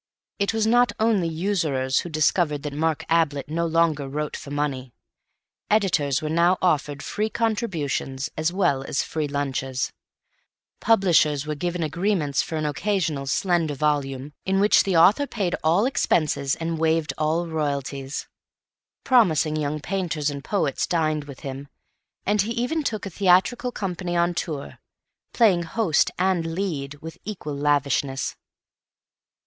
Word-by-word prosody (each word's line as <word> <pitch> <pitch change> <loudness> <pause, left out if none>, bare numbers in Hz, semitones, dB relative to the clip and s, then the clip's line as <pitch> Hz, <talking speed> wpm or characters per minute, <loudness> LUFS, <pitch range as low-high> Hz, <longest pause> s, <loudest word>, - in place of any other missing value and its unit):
It 200 - +1
was 220 -1 0
not 240 +2 +4
only 215 -6 +2
usurers 160 -7 0
who 175 - -5
discovered 155 -1 +1
that 150 -1 -4
Mark 160 +1 -1
Ablett 160 -4 +1
no 170 +2 0
longer 160 -4 +1
wrote 150 +2 -3
for - - -8
money; 140 -4 -3 0.8
editors 165 -10 +2
were - - -1
now 170 +3 +3
offered 145 -5 0
free 215 +1 -2
contributions 170 - -2
as 155 +2 0
well 175 -8 +1
as 135 - -1
free 155 -2 -3
lunches; 135 -2 -2 0.9
publishers 170 -9 +3
were 155 - -2
given 175 +3 -2
agreements 165 -3 0
for 160 - -5
an 155 -1 -1
occasional 155 -3 -1
slender 165 -1 +1
volume, 140 -1 -1
in 190 0 +1
which 205 +2 +5
the 190 -4 +2
author 205 +12 +5
paid 195 -8 -2
all 170 +7 +3
expenses 155 - +1
and 165 -1 -3
waived 160 -1 +1
all 160 +3 +1
royalties; 140 -3 -3 0.8
promising 165 - +3
young 150 0 -2
painters 165 -4 -2
and 140 -1 -7
poets 150 -9 0
dined 155 -3 0
with 140 -3 -11
him; 135 +1 -6 0.6
and 205 0 +3
he 220 +4 -2
even 250 +7 -1
took 220 -8 -3
a 195 - -5
theatrical 195 +8 +3
company 180 -4 -3
on 170 +1 +2
tour, 155 -5 -5 0.5
playing 205 -7 +4
host 170 -1 +1
and 175 -3 0
"lead" 150 -7 -3
with 160 0 -8
equal 175 -8 -5
lavishness. 140 -2 0
160 Hz, 145 wpm, -24 LUFS, 145-190 Hz, 0.9 s, which